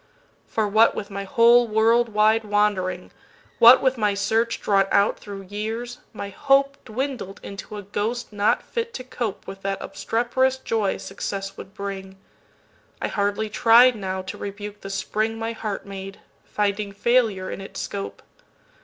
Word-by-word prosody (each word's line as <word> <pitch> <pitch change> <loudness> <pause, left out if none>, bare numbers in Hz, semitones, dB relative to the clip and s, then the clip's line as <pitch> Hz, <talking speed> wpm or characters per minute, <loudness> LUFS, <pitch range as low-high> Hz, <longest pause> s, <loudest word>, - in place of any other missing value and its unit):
For, 220 -2 0
what 220 +3 +4
with 200 - -5
my 200 0 -4
whole 235 +4 +5
world 230 +2 +3
wide 215 +1 +3
wandering, 205 -4 0 0.5
What 235 +2 +9
with 260 -2 +2
my 210 -2 +2
search 225 +3 0
drawn 195 -1 +2
out 200 - +3
thro' 200 -1 -8
years, 220 +5 -5
my 200 -2 -6
hopeDwindled 275 -4 0
into 200 +1 -8
a 205 - -7
ghost 215 +4 -3
not 205 +1 +2
fit 465 -1 -4
to 255 - -5
copeWith 215 -6 -5
that 195 0 -2
obstreperous 240 +6 0
joy 220 -6 -1
success 195 0 -5
would 195 0 -11
bring,—I 195 -1 -9
hardly 205 +1 0
tried 235 +3 +6
now 190 -2 -4
to 185 - -7
rebuke 205 +1 -7
the 195 - -7
springMy 225 +3 -2
heart 215 -3 -5
made, 195 0 -8 0.3
finding 205 0 -1
failure 215 -3 +1
in - - -6
its 195 - -8
scope. 100 0 -5
210 Hz, 145 wpm, -23 LUFS, 195-230 Hz, 0.5 s, What